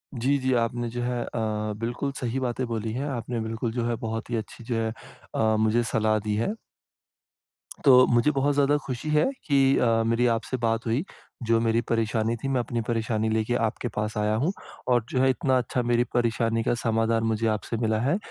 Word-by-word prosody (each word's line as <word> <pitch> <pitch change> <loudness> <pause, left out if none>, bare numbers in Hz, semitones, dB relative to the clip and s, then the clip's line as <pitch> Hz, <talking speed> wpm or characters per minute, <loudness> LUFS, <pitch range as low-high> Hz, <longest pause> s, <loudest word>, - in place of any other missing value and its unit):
जी, 135 +4 +1
जी 130 0 +1
आपने 120 0 0
जो 120 +1 -4
है, 120 -1 -1
अ, 110 -2 -2
बिल्कुल 120 +5 -2
सही 125 +1 -2
बातें 130 0 -2
बोली 115 -1 -3
हैं। 130 +4 -2
आपने 120 -3 -3
बिल्कुल 110 +1 -3
जो 120 0 -2
है, 120 - 0
बहुत 110 +1 -4
ही 120 - -1
अच्छी 110 +1 -6
जो 120 0 -3
है, 115 0 0 0.5
अ, 110 0 +2
मुझे 110 +2 +2
सलाह 110 -1 +1
दी 105 0 -2
है। 110 - 0 1.4
तो 125 -2 +8
मुझे 120 +5 +3
बहुत 140 0 +1
ज़्यादा 145 +1 +3
खुशी 130 +3 -4
है, 150 0 +3 0.2
कि 135 -2 +4
अ, - - +2 0.2
मेरी 115 +2 +2
आपसे 115 +3 -3
बात 115 -1 0
हुई। 115 +7 0 0.4
जो 115 0 +4
मेरी 115 0 +2
परेशानी 115 0 +1
थी, 135 - -5
मैं 135 -2 +1
अपनी 120 0 -2
परेशानी 110 -1 0
लेके 110 +2 0
आपके 120 - -4
पास 105 0 -2
आया 105 +1 +1
हूँ, 170 - +2 0.4
और 120 -2 +3
जो 130 - 0
है 130 - +4
इतना 130 +1 +2
अच्छा 125 0 -1
मेरी 120 0 +4
परेशानी 115 -1 +1
का 120 - +1
समाधान 115 0 +1
मुझे 115 +1 0
आपसे 115 - -5
मिला 110 -1 +1
है। 140 +9 +2
115 Hz, 205 wpm, -26 LUFS, 110-125 Hz, 1.4 s, तो